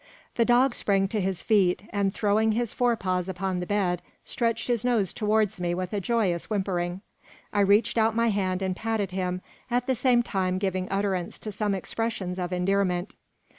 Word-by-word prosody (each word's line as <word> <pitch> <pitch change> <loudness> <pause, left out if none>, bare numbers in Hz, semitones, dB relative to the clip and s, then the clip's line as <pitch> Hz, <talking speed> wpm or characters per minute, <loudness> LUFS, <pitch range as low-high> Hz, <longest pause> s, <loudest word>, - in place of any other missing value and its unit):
The 230 - +2
dog 245 +2 +4
sprang 195 -3 +1
to 210 0 -1
his 190 -1 -2
feet, 195 -5 +3
and 200 -1 +1
throwing 215 +2 +2
his 235 0 -1
fore 245 -1 +2
paws 185 -3 -2
upon 185 0 -2
the 180 - -4
bed, 185 -4 0 0.2
stretched 230 -1 -1
his 240 -2 +1
nose 230 -7 +1
towards 215 -3 +1
me 175 0 0
with 185 +2 -4
a 205 - 0
joyous 195 -6 0
whimpering. 185 -3 -1 0.5
I 205 - +1
reached 205 +3 +3
out 220 0 +2
my 230 0 +3
hand 190 -2 0
and 190 -1 -1
patted 220 -3 -2
him, 180 -1 -2 0.3
at 245 0 +1
the 260 - +1
same 245 0 +3
time 185 -4 -1
giving 185 -1 -2
utterance 195 -3 -1
to 215 - -6
some 205 0 -1
expressions 190 -2 -3
of 180 0 -3
endearment. 180 0 0
200 Hz, 185 wpm, -26 LUFS, 185-225 Hz, 0.5 s, dog